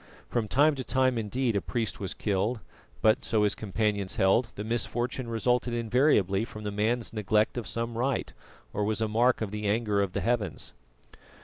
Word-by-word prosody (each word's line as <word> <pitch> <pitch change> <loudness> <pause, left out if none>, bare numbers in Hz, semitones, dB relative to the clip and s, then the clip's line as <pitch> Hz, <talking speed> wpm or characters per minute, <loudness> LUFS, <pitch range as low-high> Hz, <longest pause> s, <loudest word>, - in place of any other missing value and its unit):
From 115 -3 -1
time 145 +7 +4
to 135 -2 -4
time 130 0 +2
indeed 115 +2 -1
a 100 - +1
priest 115 -4 -2
was 95 -3 -4
killed; 105 +3 -1 0.4
but, 110 0 +4
so 110 -2 +1
his 105 - +3
companions 105 -2 -1
held, 95 +6 +3
the 105 - -4
misfortune 120 +2 -1
resulted 120 +1 +1
invariably 115 -4 +2
from 110 -2 -8
the 105 - -3
man's 110 +4 -1
neglect 105 0 +1
of 120 -5 -4
some 115 0 -3
rite, 130 +4 -1 0.4
or 105 - -1
was 105 +1 0
a 110 - +1
mark 120 +4 +2
of 105 -3 -2
the 105 0 -3
anger 105 -1 +1
of 95 -2 -1
the - - -1
heavens. 115 -4 -1
110 Hz, 185 wpm, -28 LUFS, 105-120 Hz, 0.4 s, time